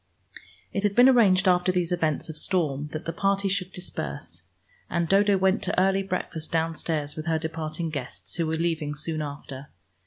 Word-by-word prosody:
It 200 - 0
had 205 -1 +1
been 245 +2 +8
arranged 205 -7 +5
after 180 0 +4
these 180 -2 -1
events 160 -4 0
of 160 - -7
storm 150 -4 +1
that 155 +2 -6
the 165 - -3
party 195 +2 +1
should 190 -1 -1
disperse, 180 -1 -5 0.5
and 170 -1 0
Dodo 200 +2 +4
went 190 +2 +2
to - - 0
early 195 +1 +3
breakfast 180 -4 -4
downstairs 160 -2 -1
with 155 +1 -6
her 160 -1 +2
departing 160 0 -4
guests, 140 -4 -6
who 165 -2 0
were 160 - 0
leaving 160 -3 -1
soon 155 +1 -3
after. 140 -1 -7
170 Hz, 180 wpm, -26 LUFS, 155-190 Hz, 0.5 s, been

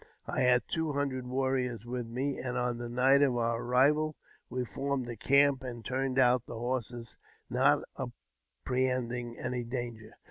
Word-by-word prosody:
I - - -1
had 125 0 +4
two 160 -2 -1
hundred 135 -3 -2
warriors 130 -3 -1
with 120 -1 -4
me; 130 +4 -2
and 125 -1 -3
on 125 -1 -1
the 120 0 -5
night 130 +3 +4
of 130 -4 +3
our 115 0 0
arrival 145 +5 +3 0.3
we 125 -1 -2
formed 135 0 -2
a 120 - -5
camp 140 +3 +3
and 120 -3 -6
turnedj 130 0 -1
out 125 -2 +4
the 115 - -6
horses, 120 -1 -4 0.3
not - - +4 0.8
apprehending 125 -2 -1
any 125 0 -2
danger. 120 -2 -5
125 Hz, 155 wpm, -31 LUFS, 120-135 Hz, 0.8 s, had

